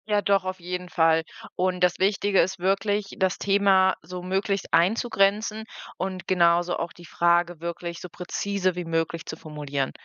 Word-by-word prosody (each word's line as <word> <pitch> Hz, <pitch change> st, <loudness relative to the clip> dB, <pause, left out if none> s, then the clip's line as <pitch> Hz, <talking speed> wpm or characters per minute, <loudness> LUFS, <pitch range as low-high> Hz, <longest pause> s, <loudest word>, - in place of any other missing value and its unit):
Ja, 210 Hz, -1 st, +2 dB
doch, 200 Hz, -2 st, +2 dB
auf 185 Hz, 0 st, -4 dB
jeden 180 Hz, +1 st, -5 dB
Fall. 165 Hz, -2 st, +3 dB, 0.3 s
Und 185 Hz, -1 st, 0 dB
das 180 Hz, -1 st, +2 dB
Wichtige 195 Hz, 0 st, +3 dB
ist 190 Hz, +2 st, -2 dB
wirklich, 195 Hz, +2 st, 0 dB
das 190 Hz, -1 st, +1 dB
Thema 195 Hz, -2 st, +3 dB
so 180 Hz, 0 st, -8 dB
möglichst 195 Hz, +1 st, -2 dB
einzugrenzen 210 Hz, +2 st, +2 dB, 0.3 s
und 185 Hz, -1 st, -4 dB
genauso 175 Hz, -1 st, +3 dB
auch 170 Hz, -, -4 dB
die 175 Hz, -, -14 dB
Frage 170 Hz, 0 st, +1 dB
wirklich 170 Hz, 0 st, -5 dB
so 180 Hz, -, -8 dB
präzise 185 Hz, +1 st, -2 dB
wie 180 Hz, -1 st, -4 dB
möglich 165 Hz, 0 st, -2 dB
zu -, -, -5 dB
formulieren. 145 Hz, -4 st, -4 dB
180 Hz, 160 wpm, -25 LUFS, 170-195 Hz, 0.3 s, Fall